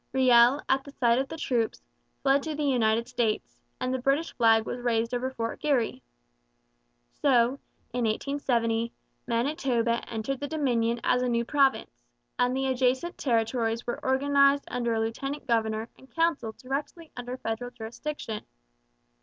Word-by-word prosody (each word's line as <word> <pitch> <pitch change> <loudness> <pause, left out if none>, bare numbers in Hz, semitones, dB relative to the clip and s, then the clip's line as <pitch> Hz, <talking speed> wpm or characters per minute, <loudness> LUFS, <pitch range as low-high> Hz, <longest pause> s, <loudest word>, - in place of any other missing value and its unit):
Riel, 255 +1 +5
at 270 0 +2
the 280 - -11
sight 235 -2 +3
of 270 - -2
the 320 - -6
troops, 240 -7 -1 0.4
fled 275 +1 +4
to 310 +1 -4
the 300 - -2
United 235 -4 +2
States, 240 -4 -2 0.2
and 255 0 -1
the 260 - -1
British 275 +6 0
flag 225 -2 +4
was 245 - -4
raised 235 -1 0
over 250 +1 -1
Fort 230 -3 -4
Garry. 275 -7 0 1.2
So, 255 -1 +3 0.3
in 245 -1 0
1870, 230 -1 0 0.3
Manitoba 240 -2 0
entered 235 +4 -3
the 285 - -3
Dominion 240 -6 0
as 250 - +2
a 250 - 0
new 235 0 +1
province, 275 0 +1 0.4
and 250 +1 +2
the 270 - 0
adjacent 260 +5 +1
territories 230 -2 0
were 240 - -4
organized 280 +1 +3
under 235 -2 -1
a - - 0
lieutenant 275 +6 -3
governor 220 -2 0
and 265 - -19
council 330 -9 0
directly 290 +5 -5
under 245 +1 -5
federal 225 +1 -4
jurisdiction. 235 0 -6
250 Hz, 150 wpm, -27 LUFS, 230-275 Hz, 1.2 s, Riel